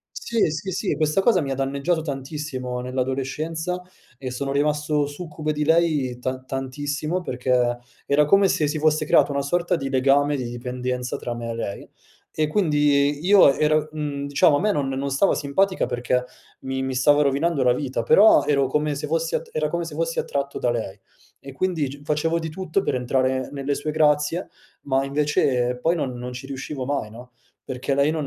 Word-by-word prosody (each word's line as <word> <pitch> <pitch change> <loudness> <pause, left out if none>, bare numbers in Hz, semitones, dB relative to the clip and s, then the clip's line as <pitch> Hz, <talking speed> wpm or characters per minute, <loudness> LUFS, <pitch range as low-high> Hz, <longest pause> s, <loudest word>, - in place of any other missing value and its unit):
Sì, 230 -8 0
sì, 160 +5 -4
sì 190 -1 -1
questa 155 +5 +1
cosa 225 -5 +4
mi 140 -3 -3
ha - - 0
danneggiato 140 +5 -1
tantissimo 135 -3 -4
nell'adolescenza, 135 +7 -3 0.4
e 130 -1 -5
sono 135 +2 -3
rimasto 150 +1 +1
succube 155 0 -4
di 150 0 -1
lei 155 -6 +2
tan 130 +1 -4
tantissimo, 145 +6 -3
perché 125 -3 0 0.3
era 145 +1 +4
come 195 +5 +5
se 150 -4 +1
si 155 +2 -2
fosse 155 0 +2
creato - - +4
una 140 - 0
sorta 175 +5 0
di 135 -4 -2
legame, 140 +2 +3
di 125 -3 -4
dipendenza 125 +1 -3
tra 120 - -5
me 115 0 -5
e - - -3
lei; 105 -3 -5 0.4
e 155 -1 0
quindi 145 -4 +2
io 190 -8 +6
ero 155 0 +2
mhmm, 145 -2 -4
diciamo 145 +1 +4
a - - 0
me 210 +2 +2
non 145 -8 0
non 135 +1 -2
stava 140 +9 +3
simpatica 185 +7 0
perché 125 +1 -1 0.4
mi 130 0 -3
mi 130 0 -2
stava 145 +3 +4
rovinando 140 +1 +1
la 125 -1 +4
vita, 130 -4 -2
però 205 - +6
ero 140 -2 +2
come 150 +2 0
se 145 +1 -4
fossi 165 +2 -1
attr - - -2
era 155 0 +1
come 170 0 -2
se 155 - -8
fossi 165 +1 -2
attratto 140 0 -2
da 120 - +1
lei 110 -4 -4 0.4
e 135 - -10
quindi 160 -1 -1
g 140 +2 -10
facevo 160 +3 0
di 160 -1 -5
tutto 185 +2 -2
per - - -1
entrare 130 +1 0
nelle 140 0 -2
sue 150 +2 -3
grazie, 150 +3 +2 0.3
ma 135 0 0
invece 135 -3 +1
poi 165 +6 +2
non 135 -5 -2
non 125 +1 -6
ci 130 +2 -7
riuscivo 135 0 -5
mai 130 -6 -2
no, 125 +2 -12 0.3
perché 130 +1 -2
lei 140 +2 +3
non. 155 -2 -2
145 Hz, 190 wpm, -23 LUFS, 130-155 Hz, 0.4 s, io